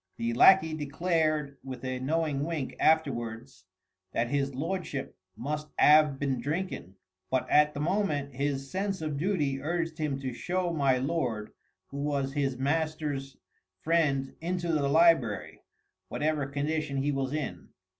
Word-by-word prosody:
The 115 0 -1
lacquey 160 +5 +6
declared 155 -1 0
with 130 -1 -7
a 130 0 -2
knowing 150 +1 0
wink 155 -4 -3
afterwards 120 -10 0 0.5
that 120 +1 0
his 140 -1 -1
lordship 155 -2 -3 0.2
must 150 +5 -3
'ave 150 -2 +6
been 135 -3 -1
drinkin'! 150 - -3 0.3
But 130 -1 0
at 150 0 +5
the 145 - -3
moment 150 -6 0
his 135 0 -2
sense 195 -1 -2
of 155 -2 -2
duty 150 -7 0
urged 165 +1 -2
him 145 -3 -1
to 130 -2 -3
show 175 +6 -1
my 140 -4 +3
lord 125 -7 -2 0.4
who 140 - -6
was 140 -1 -1
his 135 -3 0
master's 145 -1 -2 0.5
friend 150 -5 +1
into 175 0 -1
the 140 -3 +1
library, 155 -9 +3 0.5
whatever 150 -2 -1
condition 145 +1 -2
he 140 +2 +1
was 135 -1 -1
in. 150 -3 -4
145 Hz, 140 wpm, -29 LUFS, 135-160 Hz, 0.5 s, lacquey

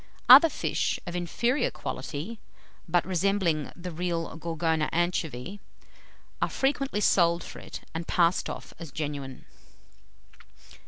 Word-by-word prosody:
Other 330 - +10
fish, - - -1
of 175 -1 -5
inferior 235 - 0
quality, 165 +10 -6 0.5
but 175 -1 +2
resembling 185 -4 0
the 180 0 -7
real 170 0 -3
Gorgona 160 -1 -1
anchovy, 175 0 -2 0.8
are - - +2
frequently 270 -5 0
sold 170 -3 +3
for - - -9
it, - - -9
and 165 +1 -4
passed 170 0 +2
off - - -7
as 165 -4 -8
genuine. 140 -3 -5
170 Hz, 115 wpm, -27 LUFS, 160-190 Hz, 0.8 s, Other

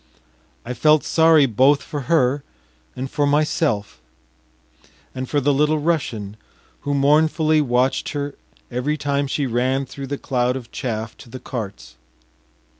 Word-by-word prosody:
I 125 - -4
felt 150 +5 +4
sorry 160 -3 +5
both 135 +4 +3
for 145 - -5
her 140 -3 +2 0.5
and 130 +1 -4
for 145 +2 0
myself 145 -7 0 1.1
and 130 0 -5
for 145 - +1
the 145 +1 +2
Little 150 +3 +2
Russian, 125 -10 -2 0.4
who 145 0 -2
mournfully 155 +2 +3
watched 125 -1 +1
her 145 -1 -3 0.4
every 130 +5 -1
time 140 -1 -1
she 140 +1 -1
ran 130 +3 0
through 135 +1 -8
the 140 +1 -3
cloud 125 -2 0
of 125 -3 -8
chaff 110 -2 -4
to - - -14
the 130 - -8
carts. 95 - -7
135 Hz, 140 wpm, -21 LUFS, 125-150 Hz, 1.1 s, sorry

